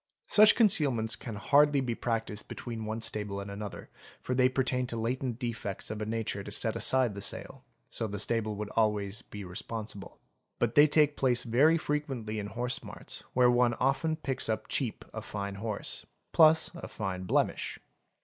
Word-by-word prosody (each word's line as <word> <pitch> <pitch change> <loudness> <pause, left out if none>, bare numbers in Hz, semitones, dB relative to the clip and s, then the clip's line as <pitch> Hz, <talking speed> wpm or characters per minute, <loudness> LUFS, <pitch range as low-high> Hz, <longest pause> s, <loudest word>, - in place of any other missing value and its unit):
Such 215 0 +7
concealments 135 - +3
can 110 0 -7
hardly 145 +7 +4
be 125 -3 -1
practised 115 -3 -3
between 115 -3 -6
one 110 +1 -4
stable 105 -3 -2
and 100 0 -6
another, 100 0 -7 0.3
for 125 - -3
they 125 0 +4
pertain 130 -1 0
to 115 - -4
latent 120 +1 -2
defects 115 -6 -4
of 110 0 -5
a 105 - -3
nature 110 -3 -2
to - - -8
set 110 +2 0
aside 130 -4 +3
the 100 - -7
sale, - - -3 0.2
so 110 - -3
the 100 0 -5
stable 110 0 0
would 105 0 -5
be - - -12
always 105 0 0
responsible; 105 +1 -6 0.4
but 120 -1 0
they 145 +1 +7
take 150 0 +3
place 125 -2 +1
very 140 +8 +4
frequently 135 -9 -3
in 100 - -4
horse 120 +4 -2
marts, - - -9
where 125 -1 +5
one 120 -1 +3
often 135 +6 +1
picks 135 -6 -1
up 110 0 -2
cheap 125 -6 -1
a - - -5
fine 100 -1 -5
horse— 105 +1 -4 0.3
plus 160 0 +5
a 170 - -8
fine 95 -3 -4
blemish. - - 0
115 Hz, 180 wpm, -30 LUFS, 105-130 Hz, 0.4 s, Such